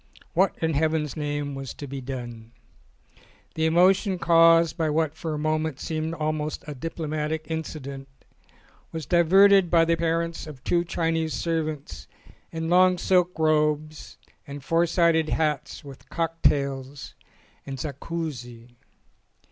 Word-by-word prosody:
What 190 +2 +2
in 160 0 +1
heaven's 155 -1 0
name 145 -2 -3
was 135 -2 -7
to 145 - -7
be 135 0 -6
done? 120 -3 -7 1.0
The 160 0 0
emotion 185 +4 +3
caused 165 -1 +5
by 160 -3 0
what 155 0 0
for 160 -1 -4
a - - -4
moment 155 -1 -1
seemed 160 0 -3
almost 155 -1 -3
a 150 - -6
diplomatic 155 +1 -4
incident 140 -4 -5 0.8
was 160 -1 -5
diverted 190 +2 +5
by 165 -1 +4
the 165 - +2
appearance 165 0 -1
of 135 -4 -11
two 175 0 +1
Chinese 165 -2 -1
servants 155 -3 -3 0.4
in 160 0 -4
long 180 +1 +4
silk 180 -1 +1
robes 155 -1 0 0.3
and 140 -1 -8
four 165 +4 +2
sided 165 -2 +2
hats 150 -3 -1
with 140 -2 -13
cocktails 140 -5 -1 0.5
and 135 -1 -5
zakouski. 135 -5 -6
160 Hz, 130 wpm, -25 LUFS, 145-165 Hz, 1.0 s, caused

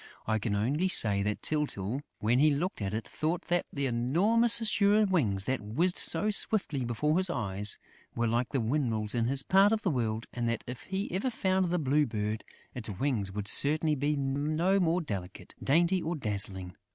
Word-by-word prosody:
I 110 0 0
can 105 -1 -2
only 140 - 0
say 105 - +5
that 105 +1 -3
Tyltyl, 140 -6 -1 0.2
when 115 +4 +1
he 155 +2 +5
looked 150 - -2
at 100 -1 -2
it, 110 +1 -4
thought 165 +3 -2
that 175 0 0
the 140 -1 -2
enormous 185 - +3
azure 210 -1 +3
wings 110 - +1
that 130 +1 -2
whizzed 160 - 0
so 205 +6 0
swiftly 190 - 0
before 150 +8 0
his 185 -1 +1
eyes 105 - -2 0.4
were 115 - 0
like 120 +2 0
the 135 - -1
windmills 115 -4 -1
in 115 -1 0
his 135 +2 +3
part 195 +2 +4
of 225 0 0
the 185 - +1
world 115 -4 -2
and 120 -1 -2
that, 115 - -3
if 125 0 -8
he 195 +1 -4
ever 190 +8 -1
found 190 -5 0
the 180 - 0
Blue 150 -1 +1
Bird, 110 -1 -3 0.3
its 115 -3 -5
wings 105 -1 -2
would 100 0 -5
certainly 155 +7 +2
be 145 +1 0
no 150 +7 0
more 175 0 +1
delicate, 100 - -7
dainty 170 +6 +2
or 165 +2 -3
dazzling. 100 - -1
140 Hz, 190 wpm, -29 LUFS, 110-175 Hz, 0.4 s, say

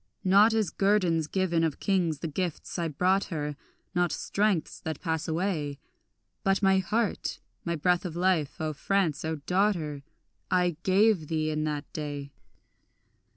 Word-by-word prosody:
Not 200 +4 +6
as 215 -6 +1
guerdons 185 -6 +2
given 175 -2 +1
of 160 -4 -1
kings 170 -7 0
the - - -2
gifts 175 +2 -3
I 170 - 0
brought 180 +6 +2
her, 150 -4 -3 0.4
Not 175 -2 +2
strengths 200 -4 0
that 160 -2 -5
pass 160 -1 -2
away; 160 -4 -1 0.7
But 195 +1 +2
my 190 0 +5
heart, 215 +3 -1 0.3
my 170 -1 0
breath 175 +3 +2
of 175 -4 -5
life, 175 -5 +1
O 155 -1 -1
France, 170 -1 0
O 160 0 -1
daughter, 180 -7 +1 0.5
I 180 -2 +2
gave 190 -3 +3
thee 155 -1 0
in 155 0 -1
that 150 -1 -2
day. 145 -2 -5
170 Hz, 150 wpm, -28 LUFS, 155-190 Hz, 0.7 s, Not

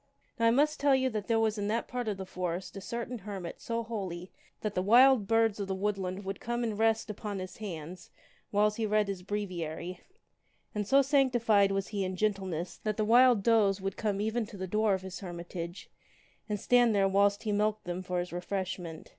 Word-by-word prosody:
Now 230 - +4
I - - +7
must 290 +6 +2
tell 280 -1 +4
you 260 0 +1
that 215 -2 -4
there 230 -1 +2
was 220 -1 +1
in 205 - -1
that 225 +2 -1
part 245 -2 -4
of 205 -2 -1
the 190 - -5
forest 180 0 -4
a 195 - -6
certain 235 +3 -5
hermit 195 -4 -7
so 230 0 -2
holy 190 -6 -5 0.3
that 210 -2 -2
the 185 - 0
wild 240 +2 +6
birds 225 -1 +2
of 200 - -3
the 190 - -2
woodland 195 -1 -2
would 195 +1 -4
come 240 +1 -2
and 225 -3 -1
rest 225 0 +1
upon 210 -1 -5
his 185 -1 -7
hand 180 -4 -7 0.4
whiles 210 +1 +2
he 225 -1 0
read 210 0 +2
his 195 -2 -4
breviary; 180 -3 -4 0.7
and 210 -1 -2
so 275 +3 +5
sanctified 240 -7 +3
was 195 0 -1
he 205 -2 -2
in 185 0 -3
gentleness 190 -4 -2
that 215 -1 -3
the 215 - +1
wild 240 -1 +6
does 205 -4 +3
would 195 0 -3
come 205 -3 -1
even 220 +1 -1
to 205 - -10
the 190 - -3
door 210 +2 +2
of 190 - -6
his 190 -1 -7
hermit 175 -2 -8
age, 170 +2 -6 0.6
and 210 - 0
there - - -12
stand 220 -6 +4
whilst 200 +1 +3
he 215 - -1
milked 210 +1 0
them 175 +1 -4
for 180 -1 -3
his 175 0 -3
refreshment. 180 -2 -4
205 Hz, 215 wpm, -30 LUFS, 185-225 Hz, 0.7 s, I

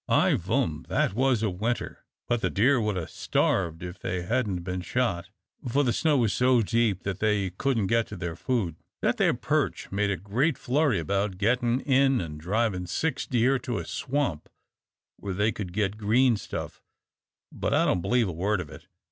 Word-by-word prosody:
"I - - +4
vum 80 0 -1
that - - +1
was 125 -1 +2
a 105 - +1
winter, 110 +7 -3 0.2
but 120 -1 0
the - - +1
deer 125 +5 +3
would 105 -3 -1
'a' 85 - -3
starved 85 -3 0
if 90 +1 -7
they 90 -1 -3
hadn't 100 -3 -1
been 90 0 -3
shot, 95 -4 -1 0.4
for 140 +5 +2
the 120 -3 +1
snow 155 -3 +2
was 115 -5 +2
so 125 -2 +3
deep 115 -3 +1
that 100 -1 -3
they 105 -3 +1
couldn't 115 +2 0
get 115 +3 +1
to - - -8
their 85 -2 -4
food. 95 - -1 0.3
That - - +2
there - - +3
Perch - - -1
made 100 +1 +1
a 100 - 0
great 115 - 0
flurry 140 -2 +1
about 95 +4 -1
gettin' 120 +4 +1
in 135 -1 +3
an' 75 -3 -5
drivin' 95 +1 -1
six 160 - -1
deer 125 +2 +2
to 120 -2 -3
a - - -4
swamp 130 - -2 0.7
where 100 -2 -5
they 105 +3 +2
could 95 -3 -6
git 105 +1 -1
green 115 +4 +3
stuff, - - -6 0.7
but - - -3
I - - +3
don't 90 - +1
believe 120 +3 +2
a - - -2
word 95 +5 0
of 80 -5 -6
it. 80 +2 -12
105 Hz, 190 wpm, -27 LUFS, 90-125 Hz, 0.7 s, I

